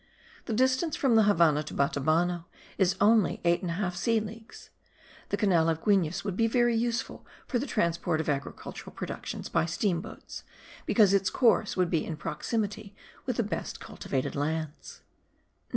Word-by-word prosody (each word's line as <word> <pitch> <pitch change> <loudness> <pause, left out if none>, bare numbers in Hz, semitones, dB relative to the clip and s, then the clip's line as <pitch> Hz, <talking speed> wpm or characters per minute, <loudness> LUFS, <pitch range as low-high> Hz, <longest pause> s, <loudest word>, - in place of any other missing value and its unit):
The 230 - -3
distance 260 +7 +2
from 265 -4 +2
the 220 -1 +6
Havannah 165 -7 +4
to 155 - -8
Batabano 165 +5 +1 0.3
is 190 -1 +3
only 215 0 +4
eight 170 0 +3
and 180 - -3
a - - -1
half 180 -2 -2
sea 225 +5 +1
leagues. 220 +1 -10 0.6
The - - 0
canal 175 -6 +3
of 160 0 -2
Guines 185 -5 +2
would 200 -3 -3
be 225 +3 +2
very 240 0 +2
useful 235 +1 -2 0.2
for 245 - -1
the 280 - -3
transport 170 -5 0
of 160 - -2
agricultural 140 -2 -5
productions - - -5
by 165 0 +1
steam 170 0 0
boats,* - - -10 0.4
because 205 -4 +5
its 195 -1 +3
course 225 -4 +2
would 180 -2 +1
be 165 - +1
in 160 - -5
proximity 210 +3 -3 0.3
with 250 - 0
the 235 - +2
best 210 - -4
cultivated 130 -2 -4
lands. 155 +1 -4
190 Hz, 170 wpm, -28 LUFS, 165-225 Hz, 0.6 s, the